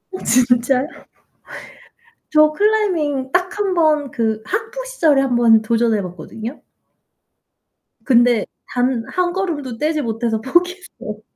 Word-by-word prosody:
어 - - -4
진짜요? 250 +2 +2 1.4
저 305 0 +5
클라이밍 320 -9 0
딱 365 0 +1
1 395 -2 0
번 305 -5 +2
그 220 -2 -1
학부 455 +5 -4
시절에 320 - +2
한번 240 -4 +4
도전해 225 -1 +1
봤거든요. 195 - -8 1.4
근데 240 -4 +3 0.2
단 245 -2 0
1 360 -1 0
걸음도 305 -11 -3
떼지 305 +3 0
못해서 225 -2 -2
포기했어요. 345 - -2
270 Hz, 220 characters per minute, -19 LUFS, 235-350 Hz, 1.4 s, 저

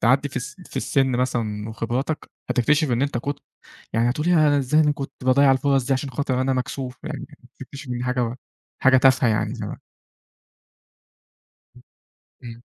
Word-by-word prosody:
تعدّي 135 +5 +3
في 130 - -10
الس 125 - -5
في - - -12
السن 135 -2 +1
مثلًا 110 -4 -1
وخبراتك، 120 +7 -3 0.2
هتكتشف 145 +4 +2
إن 120 +2 +1
أنت 140 -3 0
كنت 140 +3 -3 0.6
يعني 115 +2 +2
هتقول 150 +6 -1
ياه! 175 -1 +4
أنا 145 -1 +3
إزاي 150 +3 +3
كنت 140 -1 -6
باضيع 135 +2 +5
الفُرص 135 -1 +2
دي 135 - +3
عشان 135 +1 -2
خاطر 130 0 -1
أنا 135 +1 +1
مكسوف، 130 0 -4
يعني - - -5 0.3
تكتشف 135 +1 -9
إن 125 - -2
دي 120 - -4
حاجة 125 -2 -1 0.5
حاجة 130 0 +6
تافهة 130 -1 +4
يعني 110 -1 0
زما - - -6 2.0
ام - - -17 0.6
امم. 120 0 -10
130 Hz, 165 wpm, -23 LUFS, 120-140 Hz, 2.0 s, حاجة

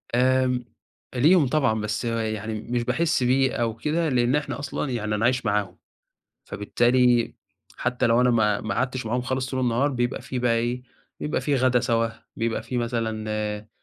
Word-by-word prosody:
آمم، 130 0 +2 0.5
ليهم 150 +4 +5
طبعًا 125 -6 +1
بس 105 +3 -2
يعني 110 -1 -2
مش 120 +1 -2
باحِسّ 130 +2 +1
بيه 130 +1 +3
أو 115 -1 -1
كده، 155 +6 0
لإن 125 +1 +2
إحنا 150 -1 -2
أصلًا 140 0 -3
يعني 110 -3 -1
أنا 110 - 0
عايش 125 +1 +1
معاهم، 100 -3 -1 0.7
فبالتالي 120 +3 +2 0.4
حتى 120 0 0
لو 115 +2 +4
أنا 125 - +4
ما 105 -3 +2
ما - - -2
أقعدتش 125 0 -2
معاهم 125 +3 0
خالص 130 +1 -2
طول 130 - -2
النهار، 125 +3 +2
بيبقى 120 -2 -1
في 130 - -4
بقى 120 -1 +2
إيه، 120 +2 -1 0.4
بيبقى 150 - -2
في 145 - +1
غدا 130 -1 +3
سوا، 115 -1 +1 0.3
بيبقى 115 -1 -2
في 125 +2 -4
مثلًا 110 -3 -2
120 Hz, 170 wpm, -25 LUFS, 115-130 Hz, 0.7 s, ليهم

